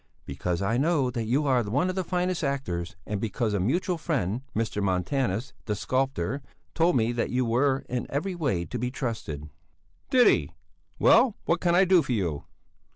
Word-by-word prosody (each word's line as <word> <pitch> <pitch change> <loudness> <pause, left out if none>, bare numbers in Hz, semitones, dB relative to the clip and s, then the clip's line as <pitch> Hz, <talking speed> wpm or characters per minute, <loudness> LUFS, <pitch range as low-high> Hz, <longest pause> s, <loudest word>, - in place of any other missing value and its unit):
"Because 85 +6 -2
I 115 +4 +1
know 140 -3 +2
that 120 -2 -3
you 135 +7 +1
are 130 -3 +3
one 120 - 0
of 185 - -2
our 190 - -1
finest 180 0 -1
actors 90 - -2
and 100 +1 -3
because 110 0 -1
a 100 - +1
mutual 165 - 0
friend, 125 - -1
Mr. 110 -2 -1
Montanus, 100 +5 -1
the 105 - -1
sculptor, 130 0 -1 0.3
told 170 -1 +3
me 115 -1 +2
that 120 -1 -1
you 125 0 +1
were 130 +4 +1
in 125 -1 -3
every 160 +8 -2
way 135 - -1
to 120 - -5
be 125 +2 -1
trusted." 110 - -4 0.6
"Did 250 -2 +5
he? - - +3 0.4
Well, 240 -6 +5
what 170 0 +1
can 175 -1 +3
I 190 +2 +6
do 185 -2 +5
for 130 - -2
you?" 85 -10 -2
125 Hz, 185 wpm, -27 LUFS, 105-155 Hz, 0.6 s, I